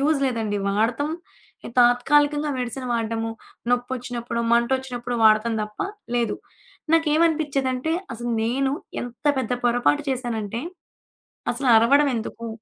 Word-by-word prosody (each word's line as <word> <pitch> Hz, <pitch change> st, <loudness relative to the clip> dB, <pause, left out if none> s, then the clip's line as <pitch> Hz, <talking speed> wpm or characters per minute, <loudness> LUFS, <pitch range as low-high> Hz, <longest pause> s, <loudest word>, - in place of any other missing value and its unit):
Use 295 Hz, +1 st, +2 dB
లేదండి. 220 Hz, -5 st, -1 dB
వాడతం 225 Hz, +8 st, +1 dB, 0.6 s
ఎ -, -, -9 dB
తాత్కాలికంగా 290 Hz, +5 st, +3 dB
మెడిసన్ 250 Hz, +1 st, -4 dB
వాడడము, 225 Hz, -1 st, -1 dB, 0.4 s
నొప్పొచ్చినప్పుడో, 245 Hz, -1 st, -2 dB
మంటొచ్చినప్పుడో 245 Hz, 0 st, 0 dB
వాడతం 215 Hz, +1 st, +4 dB
తప్ప 210 Hz, 0 st, -8 dB, 0.4 s
లేదు. 235 Hz, -3 st, 0 dB, 0.6 s
నాకేవనిపిచ్చేదంటే, 305 Hz, -3 st, +1 dB, 0.2 s
అసలు 240 Hz, +1 st, -4 dB
నేను 265 Hz, +4 st, 0 dB, 0.3 s
ఎంత 245 Hz, +4 st, -8 dB
పెద్ద 250 Hz, -1 st, -3 dB
పొరపాటు 245 Hz, +5 st, +2 dB
చేశానంటే, 235 Hz, -3 st, -3 dB, 0.9 s
అసలు 255 Hz, +2 st, -2 dB
అరవడవెందుకు? 235 Hz, -1 st, +2 dB
245 Hz, 100 wpm, -23 LUFS, 230-275 Hz, 0.9 s, వాడతం